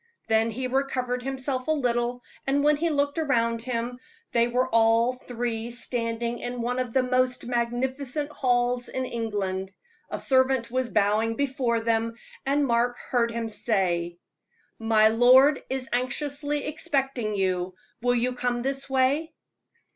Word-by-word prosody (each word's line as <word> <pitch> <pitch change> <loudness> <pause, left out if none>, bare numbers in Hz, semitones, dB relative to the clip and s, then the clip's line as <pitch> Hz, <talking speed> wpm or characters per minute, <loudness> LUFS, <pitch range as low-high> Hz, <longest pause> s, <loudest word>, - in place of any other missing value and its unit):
Then 220 +1 +3
he 255 +4 -4
recovered 255 -1 -1
himself 260 0 -3
a - - +2
little, 245 -3 0 0.2
and 280 +1 +2
when 300 0 +5
he 335 +3 0
looked 285 0 0
around 230 -7 +1
him, 245 0 -3 0.3
they 235 0 +3
were 250 +2 +1
all 230 +1 +3
three 240 -2 -4
standing 235 -1 -3
in 245 -1 -4
one 245 +2 -1
of 250 -2 -2
the 260 +2 +2
most 255 0 +1
magnificent 255 +4 -2
halls 245 -2 +1
in 260 0 -2
England. 200 -5 -3 0.4
A - - -3
servant 260 -3 +2
was 255 -1 0
bowing 215 +2 +2
before 255 -4 0
them, 230 0 0 0.3
and 285 +1 +2
Mark 245 0 +1
heard 235 -2 0
him 230 0 -3
say: 180 -6 0 0.6
"My 220 -1 +4
lord 255 +5 +6
is 265 -1 -3
anxiously 285 +3 -1
expecting 270 -7 -1
you; 185 -1 -1 0.3
will 245 +1 +2
you 245 +1 +1
come 245 -1 -1
this 270 0 -3
way?" 270 +5 +2
245 Hz, 145 wpm, -26 LUFS, 230-265 Hz, 0.6 s, lord